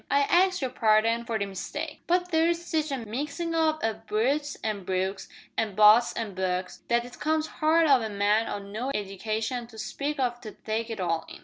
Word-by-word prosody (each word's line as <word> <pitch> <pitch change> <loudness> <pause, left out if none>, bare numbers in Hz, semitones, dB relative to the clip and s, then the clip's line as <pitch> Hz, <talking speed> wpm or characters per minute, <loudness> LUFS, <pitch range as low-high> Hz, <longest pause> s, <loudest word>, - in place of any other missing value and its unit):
I 280 - +4
ax 365 +3 +3
yer 260 - 0
parding 225 0 +2
for 225 - 0
the 200 - -1
mistake, 200 - -6
but 360 +1 +1
there's 335 +1 +3
sitch 320 -3 -1
a 275 - -1
mixin' 295 +9 -3
up 315 -1 +1
o' 225 0 +1
Brutes 280 +7 0
an' 210 -3 -2
Brookes, 190 +1 -2 0.3
an' 215 -3 -1
Butts 215 +3 +7
an' 220 -4 -4
Bucks, 185 0 -2
that 235 0 +2
it 245 0 -12
comes 310 0 +1
hard 320 +2 +2
o' 270 -4 +5
a 220 - -3
man 205 +2 +2
o' - - -3
no 205 +6 -5
edication 220 +4 -3
to 225 -1 -14
speak 280 +7 -3
of 245 -2 -1
to 215 -3 -8
take 225 +1 -3
it 225 -2 -5
all 165 -3 0
in. - - -9
230 Hz, 205 wpm, -27 LUFS, 210-300 Hz, 0.3 s, Butts